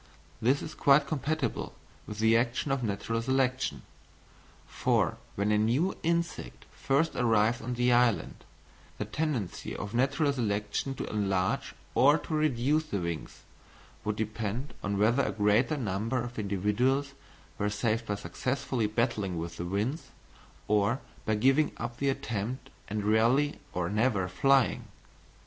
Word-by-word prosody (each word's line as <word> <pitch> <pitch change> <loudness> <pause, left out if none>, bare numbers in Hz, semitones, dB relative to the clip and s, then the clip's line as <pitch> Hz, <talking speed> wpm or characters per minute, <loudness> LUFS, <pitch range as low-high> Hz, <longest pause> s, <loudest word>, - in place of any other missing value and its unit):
This 130 +5 +2
is 155 - -6
quite 140 +1 +4
compatible 145 -3 -2 0.3
with 105 - -6
the 110 +1 +4
action 120 +4 +1
of 135 -1 0
natural 115 +1 -2
selection. 130 +1 0 0.8
For - - +1 0.2
when 100 +1 +1
a 105 - +3
new 125 - +1
insect 170 - -2
first 145 +5 0
arrived 115 -1 +2
on 125 +1 -3
the 125 +1 +2
island, 120 -2 +2 0.5
the - - -3
tendency 145 - -3
of 105 +1 -6
natural 140 +4 +2
selection 105 +2 -1
to - - -4
enlarge 95 -3 -1 0.2
or 145 +4 +5
to 160 - -6
reduce 150 0 +2
the 105 - -3
wings, 85 -2 -5 0.6
would 105 0 -1
depend 110 +4 -3
on 100 0 -1
whether 115 +6 +3
a - - 0
greater 105 +8 +2
number 115 +1 -1
of 120 -1 -6
individuals 110 +8 0 0.5
were 105 - +1
saved 110 +2 -1
by 105 - 0
successfully 120 +5 -2
battling 105 -5 -1
with 85 +1 -5
the 85 - -4
winds, 105 - -2 0.6
or 105 +4 +2 0.3
by 110 - +2
giving 135 +7 +3
up 120 +1 -5
the 140 +1 +1
attempt 120 -1 -3 0.2
and 105 0 -3
rarely 115 +8 +3
or 90 -1 -1
never 105 -1 +1
flying. 135 +6 +2
115 Hz, 140 wpm, -29 LUFS, 105-135 Hz, 0.8 s, or